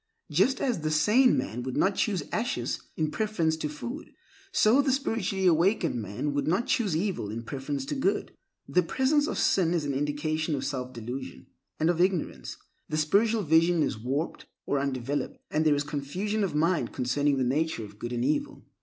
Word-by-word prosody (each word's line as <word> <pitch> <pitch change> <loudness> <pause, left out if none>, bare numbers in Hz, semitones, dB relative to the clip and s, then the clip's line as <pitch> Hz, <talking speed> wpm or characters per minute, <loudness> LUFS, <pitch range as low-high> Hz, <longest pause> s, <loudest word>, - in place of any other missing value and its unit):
Just 195 - +3
as 245 -8 0
the 155 0 -1
sane 210 - +4
man 115 +5 -3
would 130 0 -4
not 195 - +3
choose 195 -5 0
ashes 210 - -1 0.2
in 155 -1 0
preference 190 -7 0
to 155 -1 -3
food, 240 - -7 0.4
so 250 -5 +5
the 275 -1 +1
spiritually 225 -8 -1
awakened 170 - +3
man 110 +9 -3
would 145 +1 -1
not 190 +9 +2
choose 215 - +1
evil 180 - -2
in 115 +2 -5
preference 135 +2 -4
to - - -3
good. 285 +9 -1 0.3
The 180 - +3
presence 265 - +1
of - - -3
sin 175 -3 +2
is 160 -4 0
an 140 - -1
indication 150 +3 -1
of 135 - -3
self 130 -2 -3
delusion 120 - -7 0.3
and 160 - +2
of 175 0 +2
ignorance; 175 - -1 0.3
the 155 - -1
spiritual 210 +8 +2
vision 165 +1 +4
is - - -1
warped 135 +8 -3 0.2
or 140 - 0
undeveloped, 135 0 -2
and 155 +1 +2
there 150 - +5
is 145 - 0
confusion 180 +9 -2
of 185 -6 -2
mind 165 +2 +1
concerning 140 +3 +1
the 130 - +1
nature 140 -1 0
of 105 0 -14
good 120 - -5
and 120 0 -1
evil. 150 +2 -1
155 Hz, 190 wpm, -28 LUFS, 140-195 Hz, 0.4 s, so